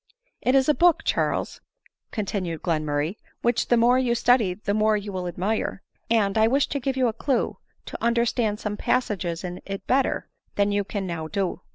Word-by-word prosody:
" - - -41
It 255 - +2
is 265 -1 +4
a 300 - +5
book, 345 +4 +4
Charles," - - -1 0.5
continued 185 -7 -3
Glenmurray, 155 +1 -1
" - - -41
which 240 0 +1
the 240 - +4
more 245 +2 +4
you 245 -2 +1
study 235 -6 +3
the 200 0 -2
more 215 0 +3
you 205 0 -5
will 180 -1 -3
admire; 195 +3 -2 0.3
and 220 -2 +2
I 220 - +5
wish 270 +4 +3
to 280 - -2
give 265 0 -2
you 255 -1 +3
a. 225 - -1
clue 260 +3 -1 0.3
to - - -8
understand 235 -2 +1
some 210 -1 -3
passages 195 -10 -1
in 180 0 -6
it 195 0 -6
better 265 +1 +1 0.3
than 200 0 +2
you 205 0 +1
can 200 0 -4
now 165 -3 -4
do." 185 +3 -2
215 Hz, 200 wpm, -25 LUFS, 185-240 Hz, 0.5 s, a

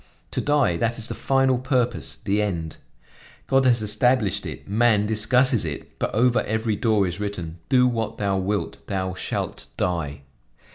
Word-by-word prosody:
To - - -1
die, 145 - +2
that 115 +6 -1
is 115 - 0
the - - -3
final 135 -2 +2
purpose, 125 -2 -1
the 105 +1 -1
end. 85 -7 -3 0.7
God 135 0 +2
has 120 -3 +3
established 105 -2 +1
it, - - -8
man 105 0 +3
discusses 115 +3 +3
it; 75 -4 -7
but - - -1
over 125 +2 +3
every 110 0 -1
door 105 -1 +2
is 90 +2 -4
written: 90 -5 -5
'Do 125 -1 +5
what 115 -2 -2
thou 100 -2 0
wilt, 100 +2 -2
thou 95 -2 -2
shalt - - -4
die.' 75 -5 -2
105 Hz, 160 wpm, -23 LUFS, 95-125 Hz, 0.7 s, Do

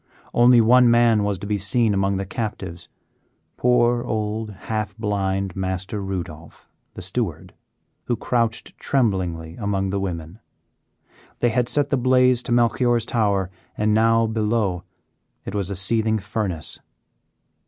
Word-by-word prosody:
Only 120 0 +6
one 125 +2 +6
man 115 -2 +4
was 100 -1 -1
to 90 - -8
be 105 0 0
seen 105 +3 +1
among 95 0 +1
the 95 - -3
captives, 95 -4 -5 0.7
poor, 120 -1 +2
old, 110 -1 -2
half 105 0 -4
blind 95 -3 -1
Master 95 +2 -3
Rudolph, 85 -5 -7 0.3
the - - -7
steward, - - -3 0.5
who 120 - 0
crouched 115 0 -1
tremblingly 90 -10 -1
among 100 -3 -1
the 100 - -1
women. 85 0 -5 1.0
They 120 - +2
had 120 +1 0
set 145 -1 +1
the 140 - +1
blaze 125 -1 +4
to 125 - -6
Melchior's 120 0 +2
tower, 100 -6 0 0.3
and 105 0 +2
now, 115 +1 +4
below, 110 -4 0 0.6
it - - -5
was 100 -3 -1
a 100 - -3
seething 110 +3 +1
furnace. 100 -5 -4
105 Hz, 135 wpm, -22 LUFS, 95-120 Hz, 1.0 s, Only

